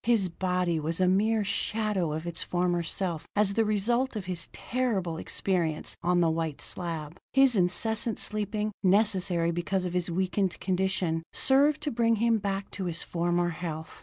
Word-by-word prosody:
His 225 -6 +3
body 180 -1 0
was 160 +3 -2
a 185 - +3
mere 210 +4 +2
shadow 200 -3 -1
of 160 +2 -4
its 170 -1 -3
former 175 -1 0
self 170 -1 -2
as 205 -1 +2
the 225 - +2
result 230 +5 +1
of 205 -3 -4
his 180 -2 -3
terrible 210 -10 -2
experience 170 -4 -1
on 175 0 +2
the 165 - +3
white 160 -2 -2
slab: 165 -1 -4
his 270 -2 +5
incessant 220 +5 +1
sleeping, 215 0 -1
necessary 185 -4 +2
because 180 +2 -1
of 180 - -3
his 180 -1 0
weakened 185 +1 -1
condition, 185 -3 0
served 280 +3 +3
to 300 -1 -2
bring 230 -1 +2
him 225 0 +2
back 195 -1 -3
to 190 - -4
his 170 -1 -3
former 175 0 0
health. 160 -2 -6
185 Hz, 165 wpm, -28 LUFS, 170-215 Hz, -, his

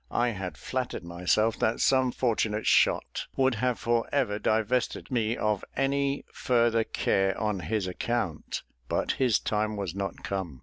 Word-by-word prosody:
I 120 +1 +1
had 95 -7 -5
flattered 130 -6 -3
myself 90 +6 +1
that 110 - +1
some 130 -2 +3
fortunate 110 -4 0
shot - - +2
would 130 -1 +3
have 125 -1 +1
for 115 0 0
ever 120 -8 +1
divested 110 +6 0
me 115 -1 0
of 105 -2 0
any 140 +1 0
further 115 -2 +2
care 95 -3 0
on 105 -2 0
his 95 +4 -1
account; 95 -2 -2 0.3
but - - +1
his 125 -6 +4
time 110 0 -1
was 95 -5 -3
not 100 -2 -4
come. 95 -9 -4
110 Hz, 150 wpm, -28 LUFS, 100-125 Hz, 0.3 s, his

